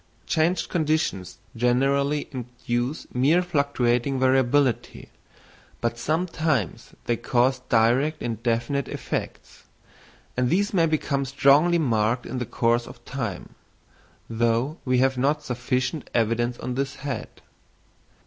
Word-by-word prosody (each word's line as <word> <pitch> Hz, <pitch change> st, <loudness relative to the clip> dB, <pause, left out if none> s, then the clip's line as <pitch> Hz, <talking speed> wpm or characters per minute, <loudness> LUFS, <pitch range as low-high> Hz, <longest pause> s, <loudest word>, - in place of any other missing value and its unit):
Changed 165 Hz, +3 st, +1 dB
conditions 155 Hz, -, -1 dB, 0.2 s
generally 140 Hz, +5 st, +1 dB
induce 125 Hz, +1 st, -3 dB
mere 150 Hz, +8 st, +3 dB
fluctuating 135 Hz, -5 st, 0 dB
variability, 130 Hz, 0 st, +1 dB, 0.7 s
but 115 Hz, 0 st, -1 dB
sometimes 155 Hz, -, -1 dB
they 120 Hz, -, +1 dB
cause 125 Hz, +2 st, +1 dB
direct 120 Hz, +7 st, +3 dB
and 115 Hz, -2 st, -3 dB
definite 120 Hz, +3 st, 0 dB
effects; -, -, -6 dB, 0.7 s
and 125 Hz, 0 st, +1 dB
these 200 Hz, +5 st, +1 dB
may 165 Hz, -4 st, +3 dB
become 150 Hz, -3 st, 0 dB
strongly 140 Hz, +6 st, +4 dB
marked 120 Hz, -5 st, +1 dB
in 130 Hz, -, -4 dB
the 125 Hz, -, -3 dB
course 120 Hz, 0 st, +1 dB
of 120 Hz, -, -13 dB
time, 115 Hz, -9 st, -5 dB, 0.7 s
though 120 Hz, +6 st, 0 dB
we 130 Hz, -1 st, +2 dB
have 130 Hz, 0 st, +2 dB
not 150 Hz, +3 st, +1 dB
sufficient 125 Hz, +3 st, -2 dB
evidence 120 Hz, +1 st, +1 dB
on 125 Hz, -, -4 dB
this 135 Hz, +1 st, -2 dB
head. 135 Hz, -4 st, -5 dB
130 Hz, 115 wpm, -25 LUFS, 120-145 Hz, 0.7 s, strongly